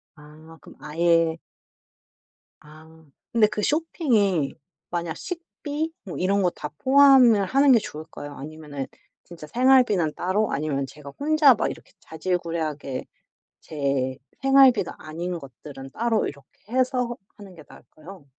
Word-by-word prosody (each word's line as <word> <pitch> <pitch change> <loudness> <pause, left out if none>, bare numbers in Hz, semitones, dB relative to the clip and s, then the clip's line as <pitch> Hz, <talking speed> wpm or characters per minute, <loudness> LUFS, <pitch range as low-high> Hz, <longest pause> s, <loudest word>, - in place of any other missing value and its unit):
아. 155 +2 -15
그럼 - - -15
아예 165 +1 +1 1.2
아. 160 +1 -17 0.3
근데 225 -3 +4
그 210 - -4
쇼핑이 225 - +1 0.4
만약 170 -2 -3
식비 325 -3 -5
뭐 190 - -7
이런 195 +2 +1
거 180 - +3
다 150 - -7
포함을 260 -6 +6
하는 275 +7 +4
게 235 - +6
좋을까요? 155 -4 -9
아니면은 145 -1 -7 0.4
진짜 165 -3 -11
생활비는 240 - +3
따로, 195 +4 0
아니면 140 -1 -1
제가 140 +1 -12
혼자 300 -1 +5
막 220 - -1
이렇게 - - -13
자질구레하게 160 -5 -3 0.6
제 135 -4 -2 0.2
생활비가 270 -7 +4
아닌 170 +3 -5
것들은 135 -1 -11
따로 225 - 0
이렇게 140 -2 -8 0.2
해서 250 -2 0 0.2
하는 200 -3 -13
게 155 - -13
나을까요? 165 +1 -14
175 Hz, 275 characters per minute, -24 LUFS, 150-240 Hz, 1.2 s, 포함을